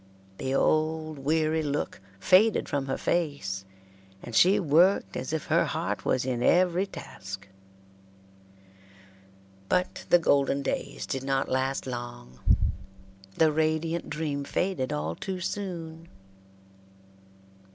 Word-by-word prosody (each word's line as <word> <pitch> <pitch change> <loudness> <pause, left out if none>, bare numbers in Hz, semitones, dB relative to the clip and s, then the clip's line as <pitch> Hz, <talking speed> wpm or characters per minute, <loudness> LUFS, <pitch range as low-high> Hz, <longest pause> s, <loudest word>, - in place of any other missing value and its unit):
The 130 +1 -1
old 155 0 +1
weary 155 +3 +1
look 145 -8 -3 0.2
faded 195 - +4
from 140 -1 -2
her 135 - -1
face, 140 - -1 0.6
and 120 - -7
she 190 - +6
worked 165 - +3
as 130 +2 -4
if 160 -2 -2
her - - +3
heart - - -3
was 125 - +1
in 125 -2 -1
every 180 +5 +3
task. 95 - -9 2.2
But 185 +1 0
the 175 - +7
golden 140 -4 +2
days - - -3
did 135 -1 -3
not 135 0 0
last 130 +1 0
long. 120 - -7 1.0
The 160 -1 +5
radiant 160 +2 0
dream 145 -2 -2
faded 165 -3 -1
all 75 +2 -2
too 185 - -4
soon. 170 -4 -5
150 Hz, 115 wpm, -28 LUFS, 130-170 Hz, 2.2 s, the